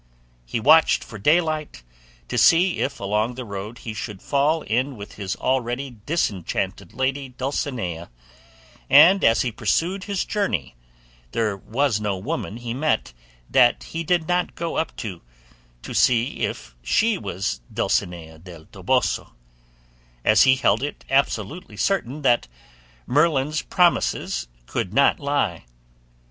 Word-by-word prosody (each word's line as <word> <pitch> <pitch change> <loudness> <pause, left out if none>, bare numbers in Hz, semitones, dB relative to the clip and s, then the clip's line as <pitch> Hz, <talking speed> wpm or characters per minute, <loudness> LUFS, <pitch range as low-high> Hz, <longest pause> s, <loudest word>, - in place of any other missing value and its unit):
He 115 - -2
watched 155 +7 +5
for 110 - -10
daylight, 155 - +1 0.4
to - - -4
see 175 +2 +4
if - - -2
along 105 +4 -1
the 130 0 -6
road 105 +2 -6
he 115 - -7
should 105 -2 -6
fall 150 +6 +1
in 125 +3 -1
with 100 0 -9
his 100 -2 -4
already 130 0 -2
disenchanted 100 - -2
lady 135 +1 -1
Dulcinea; 125 - -4 0.8
and 175 +8 +7
as 115 - +4
he 125 - -2
pursued 180 - -1
his 200 -2 -2
journey 105 - -2 0.6
there 110 -3 0
was 115 +3 -1
no 105 -2 -1
woman 100 +3 -4
he 120 -1 -5
met 130 - -1 0.3
that 125 -2 +4
he 165 0 -5
did 165 0 +1
not 180 0 0
go 170 -1 -4
up 160 - -2
to, 95 -6 -6 0.6
to - - -7
see 120 0 +2
if - - -7
she 215 - +1
was 75 -10 -3
Dulcinea 80 -2 -2
del 85 -2 -12
Toboso, - - -1 0.9
as 110 - +5
he 130 -1 +6
held 115 -4 +2
it 145 +2 -5
absolutely 140 - -1
certain 145 - -1
that 120 - +3 0.6
Merlin's 150 +1 +2
promises 170 - +1 0.2
could 90 - -3
not 140 +1 +4
lie. 140 - -1
125 Hz, 135 wpm, -23 LUFS, 105-150 Hz, 0.9 s, and